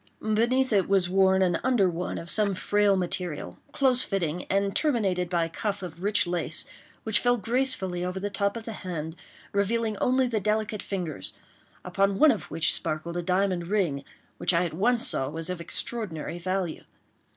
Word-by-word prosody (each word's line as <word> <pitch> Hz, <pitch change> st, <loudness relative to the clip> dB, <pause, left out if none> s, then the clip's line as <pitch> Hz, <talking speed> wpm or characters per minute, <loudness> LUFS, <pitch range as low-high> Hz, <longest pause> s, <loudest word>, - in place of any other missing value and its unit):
Beneath 235 Hz, +4 st, +1 dB
it 195 Hz, -2 st, +2 dB
was 190 Hz, -3 st, +3 dB
worn 190 Hz, 0 st, +4 dB
an 175 Hz, -2 st, +1 dB
under 245 Hz, -7 st, +3 dB
one 175 Hz, 0 st, -3 dB
of 165 Hz, -, -7 dB
some 200 Hz, +1 st, +1 dB
frail 205 Hz, +1 st, +3 dB
material, 180 Hz, -3 st, -3 dB
close 260 Hz, -3 st, +3 dB
fitting, 180 Hz, -3 st, -2 dB
and 195 Hz, 0 st, 0 dB
terminated 195 Hz, -, +1 dB
by 170 Hz, -2 st, +1 dB
a -, -, -6 dB
cuff 200 Hz, +3 st, -3 dB
of 170 Hz, -1 st, -8 dB
rich 205 Hz, +1 st, +3 dB
lace, 175 Hz, -2 st, -2 dB, 0.4 s
which 220 Hz, -2 st, +2 dB
fell 245 Hz, 0 st, +3 dB
gracefully 225 Hz, -6 st, -1 dB
over 180 Hz, +1 st, -3 dB
the 200 Hz, -, -2 dB
top 200 Hz, +2 st, 0 dB
of 225 Hz, -, -8 dB
the 225 Hz, -, -4 dB
hand, 165 Hz, -5 st, -5 dB, 0.4 s
revealing 215 Hz, +2 st, 0 dB
only 255 Hz, +4 st, +2 dB
the 225 Hz, -3 st, 0 dB
delicate 215 Hz, +1 st, -1 dB
fingers, 170 Hz, -, -4 dB, 0.5 s
upon 195 Hz, 0 st, +1 dB
one 310 Hz, +4 st, +7 dB
of 220 Hz, -, -3 dB
which 165 Hz, -, +2 dB
sparkled 155 Hz, +2 st, -3 dB
a 175 Hz, -, -1 dB
diamond 180 Hz, -1 st, 0 dB
ring, 175 Hz, -9 st, 0 dB, 0.4 s
which 180 Hz, -, +2 dB
I 170 Hz, +1 st, +3 dB
at 170 Hz, -, -4 dB
once 235 Hz, +7 st, +2 dB
saw 130 Hz, -, 0 dB
was 165 Hz, +3 st, -2 dB
of 180 Hz, -2 st, -5 dB
extraordinary 175 Hz, -3 st, -3 dB
value. 185 Hz, -1 st, -2 dB
195 Hz, 180 wpm, -27 LUFS, 175-215 Hz, 0.5 s, one